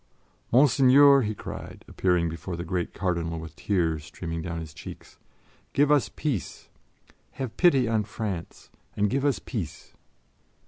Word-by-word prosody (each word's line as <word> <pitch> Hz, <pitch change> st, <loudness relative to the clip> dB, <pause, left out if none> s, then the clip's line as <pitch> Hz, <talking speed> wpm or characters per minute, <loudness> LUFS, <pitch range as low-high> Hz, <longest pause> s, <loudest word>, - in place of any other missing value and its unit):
"Monseigneur!" 135 Hz, +2 st, +6 dB
he 110 Hz, -2 st, -2 dB
cried, -, -, -8 dB
appearing 90 Hz, -2 st, +1 dB
before 85 Hz, +2 st, -5 dB
the 85 Hz, -, -5 dB
great 90 Hz, 0 st, -2 dB
Cardinal 85 Hz, -3 st, -2 dB
with 80 Hz, -1 st, -8 dB
tears 80 Hz, -6 st, 0 dB
streaming 85 Hz, 0 st, -6 dB
down 85 Hz, 0 st, -4 dB
his 80 Hz, -2 st, -8 dB
cheeks, -, -, -11 dB, 0.5 s
"give 145 Hz, +1 st, +3 dB
us 135 Hz, -8 st, +3 dB
peace! 125 Hz, -, -3 dB, 0.6 s
Have 130 Hz, -4 st, -5 dB
pity 140 Hz, -9 st, +4 dB
on 110 Hz, -2 st, +1 dB
France 105 Hz, -5 st, -6 dB, 0.3 s
and 105 Hz, -1 st, +2 dB
give 135 Hz, 0 st, 0 dB
us 145 Hz, -3 st, +2 dB
peace." 100 Hz, -, -6 dB
100 Hz, 140 wpm, -26 LUFS, 85-130 Hz, 0.6 s, Monseigneur